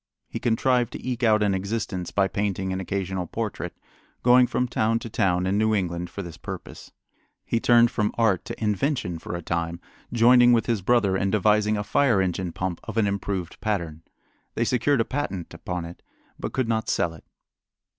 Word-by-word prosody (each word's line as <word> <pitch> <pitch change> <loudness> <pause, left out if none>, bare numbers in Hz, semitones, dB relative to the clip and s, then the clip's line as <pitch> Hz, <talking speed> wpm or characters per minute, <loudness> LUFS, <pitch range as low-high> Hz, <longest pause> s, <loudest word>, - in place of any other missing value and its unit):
He - - -5
contrived 120 +1 +1
to - - -7
eke 125 -1 -2
out 110 -3 +4
an 100 -2 +2
existence 95 -2 -3
by 100 -1 +2
painting 95 -2 -2
an 95 - -2
occasional 95 -1 -3
portrait, - - -4 0.5
going 125 0 +6
from 125 - 0
town 115 -1 +1
to 115 -1 -7
town 90 -3 +1
in 100 +2 +1
New 110 0 +2
England 90 -3 -2
for 100 +3 -6
this 85 -2 -9
purpose. - - -9 0.5
He 115 - 0
turned 120 0 +5
from 105 -1 0
art 110 -6 +2
to - - -7
invention 105 - -1
for 85 - -6
a 85 - -6
time, 85 +1 -2 0.3
joining 120 +1 +6
with 115 -2 +3
his 115 -4 0
brother 100 -2 +2
in 95 +1 0
devising 105 +1 +2
a 105 - -2
fire 125 -1 +2
engine 90 -1 -1
pump 90 0 -3
of - - -6
an 110 - +4
improved 100 -3 -3
pattern. 85 -8 -2 0.5
They 115 - +1
secured 125 +2 +2
a - - 0
patent 115 - -4
upon 90 -2 -5
it, 85 +1 -10 0.4
but - - -4
could 130 -3 -1
not 110 -1 -1
sell 85 - +1
it. 80 - -15
105 Hz, 190 wpm, -25 LUFS, 90-115 Hz, 0.5 s, going